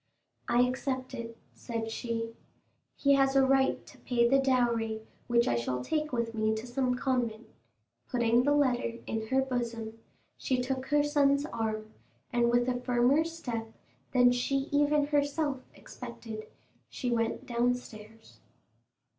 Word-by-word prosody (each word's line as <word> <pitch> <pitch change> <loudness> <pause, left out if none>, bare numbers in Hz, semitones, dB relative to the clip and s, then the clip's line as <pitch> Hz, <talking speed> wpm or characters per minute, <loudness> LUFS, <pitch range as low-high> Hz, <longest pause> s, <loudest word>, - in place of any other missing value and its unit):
"I 240 - +4
accept 255 +1 -2
it," 230 -1 -6 0.2
said 225 -2 -4
she; 230 0 -3 0.6
"he 280 0 +3
has 270 0 +3
a 270 -1 +6
right 270 0 +2
to - - -16
pay 235 -2 +2
the 270 +3 +4
dowry, 235 -4 +1 0.2
which 235 0 +3
I - - +2
shall 125 +2 -2
take 305 - -1
with 235 -2 -1
me 220 0 +1
to 220 +2 -5
some 250 0 0
convent!" 240 -4 -1 0.6
Putting 240 -1 +3
the 290 +3 +3
letter 250 -5 +1
in 220 -1 -3
her 265 +3 +2
bosom, 230 -3 -4 0.4
she 255 -1 0
took 260 +1 -2
her 290 0 +3
son's 285 -1 +3
arm, 220 -4 -3 0.4
and 240 -1 +3
with 240 +1 +2
a 245 -1 -1
firmer 250 +4 +3
step 245 -9 -5 0.4
than 245 -1 +5
she 270 +3 0
even 290 0 +3
herself 290 -1 0 0.2
expected 220 -2 -9 0.4
she 250 -3 -3
went 230 -1 -1
downstairs. 225 - -3
245 Hz, 145 wpm, -30 LUFS, 230-270 Hz, 0.6 s, a